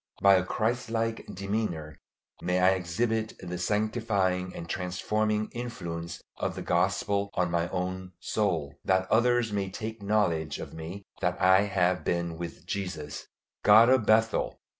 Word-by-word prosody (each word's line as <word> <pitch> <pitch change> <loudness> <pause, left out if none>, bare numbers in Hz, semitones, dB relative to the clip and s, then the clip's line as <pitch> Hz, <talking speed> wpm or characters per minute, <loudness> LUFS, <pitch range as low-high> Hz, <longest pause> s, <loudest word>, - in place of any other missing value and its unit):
By 100 0 +8
a 95 -1 +4
Christ 115 +5 -1
like 115 0 -1
demeanor 95 -6 -3 0.4
may 90 0 +1
I 90 +1 +6
exhibit 110 +5 -1
the 90 -1 -5
sanctifying 100 -3 0
and 85 - -6
transforming 105 +5 -1
influence 85 -9 -5
of - - -2
the - - -5
Gospel 100 0 +1
on 90 -1 +1
my 85 0 0
own 90 0 -3
soul, 80 -10 -1
that 95 0 +2
others 120 -1 +3
may 100 -2 -1
take 110 +2 -6
knowledge 90 -7 +1
of - - -8
me 80 +5 -7 0.2
that 90 -1 0
I 95 +2 +5
have 90 -2 +1
been 85 -1 -1
with 85 -1 -7
Jesus. 85 -7 -5 0.3
God 110 +3 +7
of 130 -5 +3
Bethel! 110 +1 +2
95 Hz, 145 wpm, -28 LUFS, 90-110 Hz, 0.4 s, By